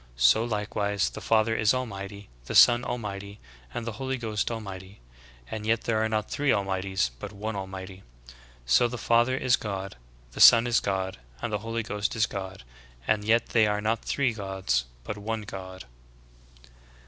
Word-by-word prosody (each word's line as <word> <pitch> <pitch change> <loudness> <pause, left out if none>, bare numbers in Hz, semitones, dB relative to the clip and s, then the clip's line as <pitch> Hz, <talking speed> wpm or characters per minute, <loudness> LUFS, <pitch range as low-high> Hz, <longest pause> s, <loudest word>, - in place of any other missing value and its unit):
So 60 - +5
likewise 105 -3 -1
the - - -8
Father 115 0 +2
is 110 +2 +3
Al 130 0 -1
mighty, 100 -1 -8 0.2
the - - -5
Son 120 0 +7
Almighty, 100 -3 -5 0.3
and 115 - -5
the 115 - -3
Holy 130 0 -1
Ghost 110 -3 -2
AJmighty; 100 -4 -7 0.6
and 110 -1 -4
yet 115 +1 +1
there 110 -2 +1
are 110 - 0
not 110 -1 -1
three 145 -1 -1
Almighties, 95 -6 0
but 105 - -6
one 105 +1 -5
Almighty. 95 -1 -7 0.6
So 60 - +4
the 125 +1 -5
Father 120 +3 +2
is 130 -2 +3
God, 95 - -5 0.3
the - - -10
Son 115 0 +9
is 120 -1 +3
God, 95 -4 -2 0.2
and 105 - -4
the 105 - 0
Holy 115 +1 -3
Ghost 105 +1 -2
is 110 -1 +3
God, 95 -6 -7 0.4
and 105 -1 +1
yet 115 +2 +2
they 110 -2 +4
are 105 0 0
not 110 +2 -1
three 130 -4 0
Gods 95 - -1 0.2
but 105 +8 -5
one 110 +1 -3
God." 95 -3 -8
105 Hz, 175 wpm, -27 LUFS, 95-115 Hz, 0.6 s, Son